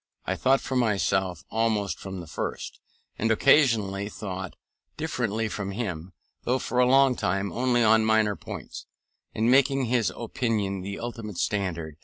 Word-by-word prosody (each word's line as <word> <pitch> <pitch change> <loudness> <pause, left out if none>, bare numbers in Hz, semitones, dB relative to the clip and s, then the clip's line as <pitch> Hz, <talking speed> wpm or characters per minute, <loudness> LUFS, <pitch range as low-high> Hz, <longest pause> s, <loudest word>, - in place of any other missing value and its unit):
I - - -1
thought 135 +1 +2
for 130 - -4
myself 95 -6 +1
almost 110 -3 0
from 95 -2 -6
the - - -9
first, 80 - -5 0.4
and 115 - +1
occasionally 110 -6 +3
thought 95 -5 -6 0.4
differently 115 -8 -1
from 100 -2 -4
him, 95 -5 -4 0.3
though 125 +2 +1
for 125 -1 -2
a 125 - +5
long 135 -1 +5
time 100 -1 -1
only 120 -1 +1
on 110 0 +5
minor 110 -2 +2
points, - - -8 0.5
and 115 +3 +2
making 135 0 +4
his 120 -2 +1
opinion 110 -5 -2
the 100 +2 -5
ultimate 115 -5 -6
standard. 85 -7 -2
110 Hz, 150 wpm, -26 LUFS, 95-120 Hz, 0.5 s, a